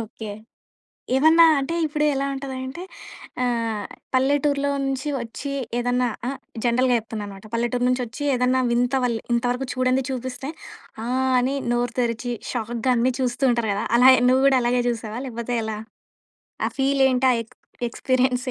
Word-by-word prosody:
Okay. 215 0 -8 0.9
ఏమన్నా 320 +4 +6 0.2
అంటే 300 +5 -3
ఇప్పుడు 300 0 -1
ఎలా 275 - -1
ఉంటదంటే 265 +3 -6 0.6
ఆహ్, 230 -4 -1 0.3
పల్లెటూరులో 280 +1 +2
నుంచి 270 +1 -2
వచ్చి 240 +4 -6 0.3
ఏదన్నా 245 +1 +1 0.2
ఆహ్, 270 0 -4 0.3
జనరల్‌గా 245 +1 +3
జెప్తున్నా 220 -1 -6
అనమాట. 195 0 -11
పల్లెటూరు 240 +1 0
నుంచి 255 0 +1
వచ్చి 250 +6 -8
ఏదన్నా 250 +1 +2
వింత 245 +2 +1
వాల్ 240 -2 +1 0.2
ఇంతవరకు 245 +2 0
చూడండి 255 +1 +1
చూపిస్తే 260 +1 -5 0.6
ఆహ్, 260 +2 0
అని 255 +2 +1 0.2
నోరు 240 0 0
తెరిచి 240 0 -1 0.2
షాక్‌గా 240 +1 -2
అన్నీ 245 +2 +2
చూస్తూ 255 +1 -1
ఉంటారు 235 -3 0
గదా! 200 +2 -2
అలాగే 260 +2 +7
నువ్వు 260 +1 +4
గూడా 270 -2 +5
అలాగే 245 +1 +2
చూసావా 230 -1 -3
లేకపోతే 235 0 -4
ఎలా? 220 -1 -4 0.9
ఆ - - 0
ఫీల్ 270 0 +2
ఏంటి? 255 0 +1
ఆ - - +3
ఎక్ 225 - -23 0.3
ఎక్స్‌పీరియన్స్ 255 +1 0
250 Hz, 150 wpm, -23 LUFS, 235-265 Hz, 0.9 s, అలాగే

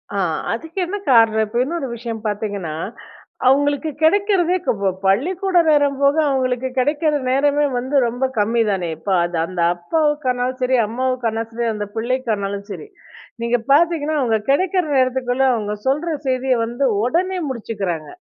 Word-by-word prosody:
ஆ - - -1 0.4
அதுக்கு 320 +10 -6
என்ன 405 +4 -4
காரணம்? 225 -2 +5
இப்ப 235 +3 -2
இன்னொரு 305 -2 -3
விஷயம் 225 -1 -6
பார்த்தீங்கன்னா, 205 -6 -3 0.7
அவங்களுக்கு 285 +3 +2
கிடைக்கிறதே 370 +1 +3
கவோ 200 -2 +1 0.2
பள்ளிக்கூட 355 - +1
நேரம் 285 -2 +3
போக 280 +1 +4
அவங்களுக்கு 260 -1 0
கிடைக்கிற 300 +4 +1 0.2
நேரமே 290 +2 +2
வந்து 260 +4 -3
ரொம்ப 245 +3 -1
கம்மிதானே. 205 -4 +1
இப்ப 180 +5 -7
அது 175 -1 -2
அந்த 185 0 -7 0.2
அப்பாவுக்கானாலும் 255 - -1
சரி 255 +1 +2
அம்மாவுக்கானாலும் 230 -2 -2
சரி, 235 0 -1
அந்த 210 -1 -4
பிள்ளைக்கானாலும் 220 -5 -2
சரி. 425 - -7 0.5
நீங்க 235 +1 +1
பார்த்தீங்கன்னா 315 0 +3
அவங்க 230 -4 +2
கிடைக்கிற 365 +5 +2
நேரத்துக்குள்ள 255 0 +1
அவங்க 210 -3 -2
சொல்ற 300 +6 0 0.2
செய்திய 260 0 +1
வந்து 240 +4 -2 0.2
உடனே 360 +9 0
முடிச்சுக்கிறாங்க. 195 - -4
255 Hz, 135 wpm, -20 LUFS, 220-295 Hz, 0.7 s, காரணம்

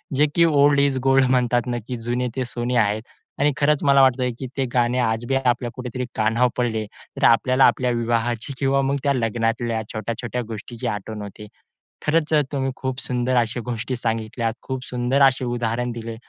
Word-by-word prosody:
जे 145 +3 +4
की 170 - +5
"ओल्ड 145 -2 +4
इस 140 -1 +2
गोल्ड" 135 0 +4
म्हणतात 125 -1 +2
ना 120 -1 -1
की 125 - -4
"जुने 120 +2 -2
ते 130 -1 -1
सोने" 120 +1 -3
आहेत. 105 -1 +2 0.4
आणि 145 +1 +3
खरंच 150 0 +2
मला 140 -1 +5
वाटतं 130 -1 +3
की 130 - -4
ते 135 - +1
गाणे 120 0 +2
आज 115 -1 0
बी 135 - 0
आपल्या 125 -2 +1
कुठेतरी 125 0 -5
कानावर 115 +3 +2
पडले 115 -3 -1 0.3
तर - - -4
आपल्याला 130 +3 +5
आपल्या 125 -1 +2
विवाहाची 120 +1 -1
किंवा 135 0 +2
मग 135 +1 0
त्या 140 -1 +2
लग्नातल्या 115 -1 -1
छोट्या-छोट्या 115 +2 -3
गोष्टीची 115 +1 -6
आठवण 105 +1 -4
होते. 105 +1 -9 0.6
खरंच 155 0 +1
अ, 150 - +5
तुम्ही 135 -1 -1
खूप 130 0 -4
सुंदर 125 0 -1
अशी 120 0 +1
गोष्टी 120 +1 -4
सांगितल्यात, 115 0 -2
खूप 130 -1 -5
सुंदर 125 +3 0
असे 135 -1 +4
उदाहरण 120 0 -1
दिले 115 0 -6
125 Hz, 185 wpm, -22 LUFS, 115-135 Hz, 0.6 s, की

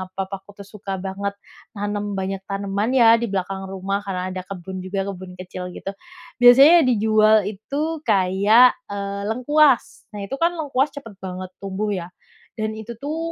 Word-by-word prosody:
papaku 195 +1 -6
tuh - - -18
suka 200 -2 -6
banget 200 +1 -3 0.4
nanem 205 0 -3
banyak 190 0 -3
tanaman 200 +4 -2
ya 230 -3 +6
di 235 - -1
belakang 195 0 -3
rumah, 195 +1 -3
karena 185 -1 -3
ada 185 0 -4
kebun 190 0 -7
juga, 195 +1 -2
kebun 185 -1 -8
kecil 180 0 -7
gitu. 195 - -5 0.5
Biasanya 270 +6 +8
dijual 215 -2 +4
itu 290 +10 -4
kayak, 200 +7 +5
eee, 200 0 -4
lengkuas, 265 +4 +2
nah 205 - -6
itu 235 +7 -4
kan 335 +3 +2
lengkuas 285 -3 0
cepet 230 -9 -10
banget 185 0 -6
tumbuh 195 +2 -3
ya, 175 -3 -3 0.5
dan 215 0 -2
itu 220 +2 -7
tuh, 300 +3 -3
200 Hz, 160 wpm, -22 LUFS, 190-235 Hz, 0.5 s, Biasanya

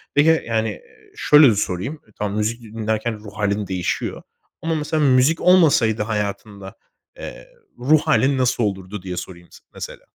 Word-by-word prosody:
Peki, 160 +2 +4
yani, 110 -1 0
eee, 105 - -13
şöyle 150 -6 +6
sorayım. 100 - -3 0.2
Tamam 105 0 -3
müzik 110 +3 -1
dinlerken 110 0 -3
ruh 105 -1 -12
hâlin 105 -1 -1
değişiyor 90 -2 -3 0.4
ama 165 0 -1
mesela 155 0 -1
müzik 135 +4 +3
olmasaydı 145 -12 +4
hayatında, 105 -1 -5 0.4
eee, - - -9 0.3
ruh 145 +5 +4
hâlin 140 -3 +2
nasıl 125 -2 +1
olurdu? 95 -1 -4
Diye 90 -1 -6
sorayım 85 -1 -8
s - - -15
mesela. - - -9
110 Hz, 145 wpm, -21 LUFS, 100-145 Hz, 0.4 s, şöyle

